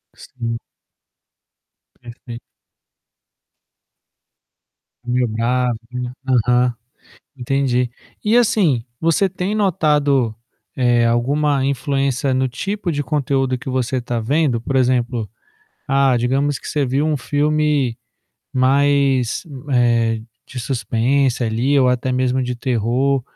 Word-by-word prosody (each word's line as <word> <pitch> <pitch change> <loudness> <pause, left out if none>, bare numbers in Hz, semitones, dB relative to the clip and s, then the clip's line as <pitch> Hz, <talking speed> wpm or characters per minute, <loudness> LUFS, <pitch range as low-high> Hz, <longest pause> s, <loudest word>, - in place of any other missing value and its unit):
Sim. 115 -2 -5 1.4
Pereito. 120 0 -11 2.6
Meio 125 0 +1
bravo. 120 +2 0 0.5
Aham, 125 0 +2 0.6
entendi. 125 -1 0 0.3
E, 215 +2 +2
assim, 180 - +2 0.2
você 165 +4 +2
tem 185 +3 -3
notado, 150 - +2 0.4
eh, 120 -2 +3
alguma 135 +4 +1
influência 135 0 0
no 130 0 +1
tipo 195 - -3
de 145 -2 -2
conteúdo 135 -2 0
que 130 - -7
você 130 0 -1
tá 120 0 -3
vendo? 130 0 +1
Por 135 - -3
exemplo, 125 -3 +1 0.6
ah, 135 -2 +3
digamos 135 +3 0
que - - -9
você 145 -2 0
viu 140 +4 0
um 155 - +1
filme 145 -2 0 0.6
mais, 135 -1 +2 0.3
eh, 115 -2 +2 0.3
de 125 - -7
suspense 125 +1 0
ali 120 +5 +1
ou 130 -2 +4
até 125 +1 0
mesmo 130 0 +1
de 125 0 -2
terror, 125 +2 0
130 Hz, 105 wpm, -19 LUFS, 120-140 Hz, 2.6 s, ou